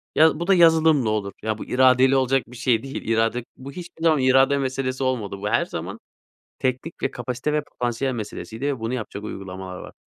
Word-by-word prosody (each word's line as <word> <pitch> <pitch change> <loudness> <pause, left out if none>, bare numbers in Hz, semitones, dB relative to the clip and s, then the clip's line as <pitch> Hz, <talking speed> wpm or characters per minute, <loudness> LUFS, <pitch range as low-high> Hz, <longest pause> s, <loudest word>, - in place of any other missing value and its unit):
ya 160 0 +5
bu 170 - -3
da 195 - +5
yazılımla 160 -7 +5
olur 105 -2 -1
ya 110 -1 -1
bu - - -7
iradeyle 130 +1 +4
olacak 135 0 +2
bir 125 0 -12
şey 125 -2 +1
değil. 135 +1 -5
İrade 115 +1 +1
bu, 135 +2 -9
hiçbir 170 0 -10
zaman 155 -3 +4
irade 135 +2 +4
meselesi 130 -1 -2
olmadı. 110 -7 -2
Bu 105 +1 -3
her - - +2
zaman - - -6 0.6
teknik, 130 +6 -2
kapasite 125 +4 -3
ve 150 -1 +1
potansiyel 125 +1 -2
meselesiydi 115 +3 -5
ve 135 -5 -2
bunu 115 +3 -2
yapacak 110 -3 -6
uygulamalar 95 -2 -7
var. - - -10
130 Hz, 190 wpm, -23 LUFS, 115-140 Hz, 0.6 s, ya